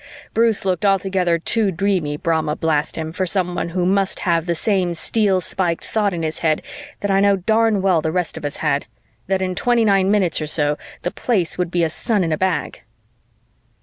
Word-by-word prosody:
Bruce 225 -3 +2
looked 185 +1 0
altogether 190 -3 +2
too 210 +5 +1
dreamy, 180 -5 -1
Brahma 160 -1 0
blast 155 -2 0
him, 160 -1 -4
for 185 +2 -2
someone 180 -2 -1
who 175 +1 -1
must 195 +1 0
have 170 -1 +1
the 170 - 0
same 180 -1 0
steel 200 +2 +1
spiked 175 -2 -1
thought 210 -2 0
in 170 -2 -4
his 155 0 -3
head 155 -2 +1 0.4
that 205 - -1
I 195 - +3
know 200 0 +4
darn 220 +1 +1
well 185 -4 +3
the 160 - -1
rest 180 0 -2
of - - -8
us 145 -1 -4
had: 140 0 0 0.4
that 190 0 0
in 185 0 -1
twenty 235 +3 +2
nine 195 -2 +3
minutes 190 -6 +2
or 155 - -3
so, 150 -1 +1 0.3
the 175 - -1
Place 185 -9 0
would 180 -1 0
be 175 -1 0
a 165 - +1
sun 210 +1 0
in 165 - -1
a 155 - +1
bag. 185 -5 -1
180 Hz, 205 wpm, -20 LUFS, 165-195 Hz, 0.4 s, know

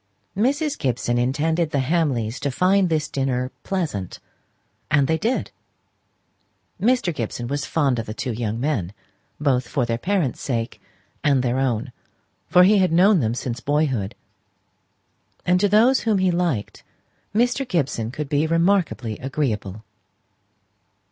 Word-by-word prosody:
Mrs. 285 - 0
Gibson 120 -1 0
intended 155 +6 0
the 145 - -1
Hamleys 135 -5 0
to 140 - -1
find 185 +6 +2
this 155 -2 0
dinner 130 -2 -1
pleasant; 155 - -3 0.7
and 145 -2 +3
they 160 +3 0
did. 240 +4 -1 1.3
Mr. 235 -5 +2
Gibson 120 -2 -4
was 140 +3 -3
fond 140 -7 +1
of 115 - -5
the 110 - -4
two 125 - -3
young 115 -1 -3
men, 120 - -1 0.5
both 130 -4 +1
for 125 -1 0
their 115 0 -2
parents' 180 - -1
sake 115 -3 -3 0.4
and 140 -3 +3
their 125 +1 0
own, 125 -5 -1 0.6
for 180 - +6
he 200 +2 +5
had 185 -2 +2
known 185 +3 +5
them 115 -3 0
since 125 -1 -4
boyhood; 135 -8 0 1.3
and 180 0 +3
to 205 +1 +2
those 230 +6 +5
whom 220 -3 +1
he 185 -1 +2
liked 170 -12 -1 0.5
Mr. 245 +4 +2
Gibson 140 - -1
could 150 +4 -5
be 145 +2 +1
remarkably 165 - +1
agreeable. 110 -7 -3
145 Hz, 140 wpm, -22 LUFS, 120-180 Hz, 1.3 s, for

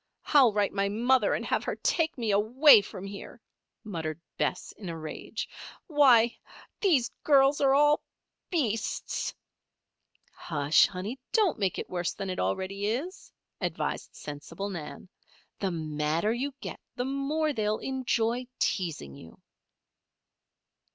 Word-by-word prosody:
I'll 270 -6 +6
write 205 -1 0
my 200 0 0
mother 235 +1 +2
and - - -4
have - - 0
her - - -2
take 330 - 0
me 230 -4 0
away 225 +5 +7
from 190 -1 -8
here," 200 0 -9 0.4
muttered 165 -7 -4 0.2
Bess, - - -2
in 195 -4 -9
a 165 - -5
rage. 155 -1 -6 0.4
"Why, 255 -7 +5 0.4
these 300 - +2
girls 280 -1 +4
are 270 -1 +4
all 295 +1 +4 0.5
beasts!" 235 - -1 1.0
"Hush, 150 -1 +3
honey! 200 +8 -6
don't 405 - +2
make 195 -3 0
it - - -4
worse 175 -1 -2
than 195 -1 -4
it 185 - -4
already 190 - -1
is," 285 - -4 0.3
advised - - -3
sensible 165 +7 -6
Nan. 160 -1 -7 0.5
"The 195 - 0
madder 155 +4 -1
you 265 +3 -3
get - - -6 0.2
the 245 - -2
more 285 +3 0
they 215 -4 -1
will 215 - +1
enjoy 250 -2 -1
teasing 165 - -2
you." 80 +4 -13
215 Hz, 135 wpm, -28 LUFS, 180-270 Hz, 1.0 s, away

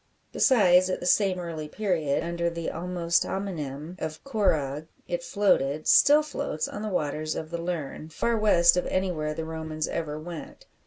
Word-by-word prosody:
Besides, 185 -7 +4
at 185 - -1
the - - -6
same 190 0 +3
early 165 -3 -5
period, 165 -7 -1
under 170 0 -1
the 170 -1 -4
almost 170 0 0
homonym 165 -4 -5
of 155 0 -5
"corragh," 155 - 0 0.2
it 175 0 -2
floated 155 -6 +1
still 295 +2 +6
floats 280 - -3
on 205 - -7
the 215 - -3
waters 155 -3 -2
of 160 0 -6
the 170 0 -3
Lerne, 160 -3 -4
far 235 +9 0
west 175 -6 +5
of 180 - 0
anywhere 165 -5 -1
the 160 - -4
Romans 160 -1 -4
ever 155 -2 -3
went. 165 0 -9
170 Hz, 165 wpm, -27 LUFS, 155-185 Hz, 0.2 s, still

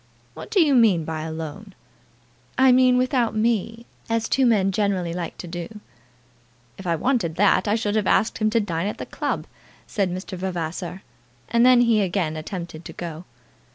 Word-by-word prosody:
"What - - -9
do 405 - +2
you 305 -5 +4
mean 210 -10 +4
by 160 -1 -4
alone?" 160 +5 -7 0.8
"I 260 0 +6
meant 250 0 +5
without 250 -3 +1
me, 225 +1 0 0.2
as 230 0 0
two 265 -2 +2
men 195 -4 +3
generally 190 -4 0
like 175 -1 -5
to 180 - -8
do." 175 +5 -7 1.0
"If 190 - -7
I 170 - +2
wanted 175 - 0
that 205 +3 +3
I 205 - +2
should 215 -2 -1
have 215 -3 +1
asked 220 - +2
him 215 -1 +2
to 230 +2 +2
dine 175 -3 -2
at 210 - -4
the - - -6
club," - - -3 0.4
said 195 -3 -1
Mr. 185 +2 -5
Vavasor, 180 0 -4 0.5
and 235 0 +3
then 250 -1 +6
he 230 -3 +3
again 180 -4 -1
attempted 170 0 -6
to - - -8
go. 170 0 -7
200 Hz, 180 wpm, -23 LUFS, 175-230 Hz, 1.0 s, I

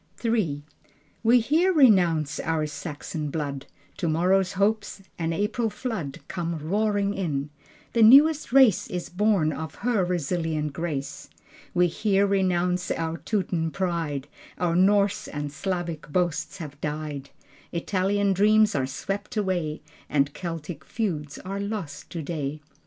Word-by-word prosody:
III 180 -11 0 0.6
We 235 +2 +5
here 325 +10 +3
renounce 180 - +4
our 160 -1 0
Saxon 150 0 -5
blood. 140 -2 -4 0.3
Tomorrow's 180 +3 +2
hopes, 205 0 0 0.2
an 165 0 0
April 210 +6 0
flood 210 - -5
Come 170 -2 -3
roaring 200 +5 0
in. 150 -7 -2 0.4
The 230 - +2
newest 285 +7 +7
race 260 -7 +5
Is 180 -1 -4
born 185 -5 +2
of 160 -2 -6
her 235 -6 +2
resilient 160 -3 -1
grace. 145 -3 -4 0.5
We 180 0 +5
here 200 +3 +2
renounce 180 -2 +1
our 165 0 -2
Teuton 165 -2 -1
pride: 165 -6 -2 0.3
Our 175 -2 0
Norse 200 +2 +3
and 145 -1 -4
Slavic 170 0 -4
boasts 175 +2 -1
have 150 -5 -8
died: 150 -2 -4 0.4
Italian 195 +3 +1
dreams 215 +2 +4
are 135 -3 0
swept 195 - -4
away, 175 -7 -1 0.3
And 140 -1 +1
Celtic 165 -3 -6
feuds 155 -7 -3
are 195 +2 -5
lost 200 -8 -5
today.... 155 -3 -4
175 Hz, 125 wpm, -26 LUFS, 155-205 Hz, 0.6 s, newest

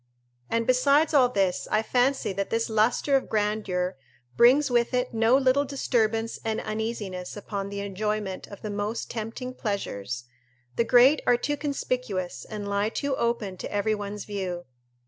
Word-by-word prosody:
And 230 0 0
besides 280 +5 +3
all 260 -4 +6
this, 195 -6 0
I 215 - +2
fancy 250 -2 +1
that 195 +1 -2
this 230 0 -1
lustre 225 +6 +2
of 270 - 0
grandeur 205 -5 -1 0.4
brings 260 +4 +5
with 240 +1 +2
it 250 0 -1
no 225 +3 +4
little 270 +1 +3
disturbance 230 -5 0
and 220 -1 -1
uneasiness 215 -4 -4
upon 200 -1 -4
the 200 0 -4
enjoyment 200 -1 -3
of 200 - -12
the 215 - -3
most 205 +3 -3
tempting 230 +3 -5
pleasures; 125 - -3 0.5
the - - +3
great 250 +5 +6
are 245 - +5
too 290 +4 -1
conspicuous 250 - -3
and 210 -1 -6
lie 200 +1 0
too 280 +3 -2
open 235 -6 -1
to - - -6
every 205 +1 +1
one's 205 0 -5
view. 185 -4 -4
220 Hz, 160 wpm, -26 LUFS, 200-250 Hz, 0.5 s, all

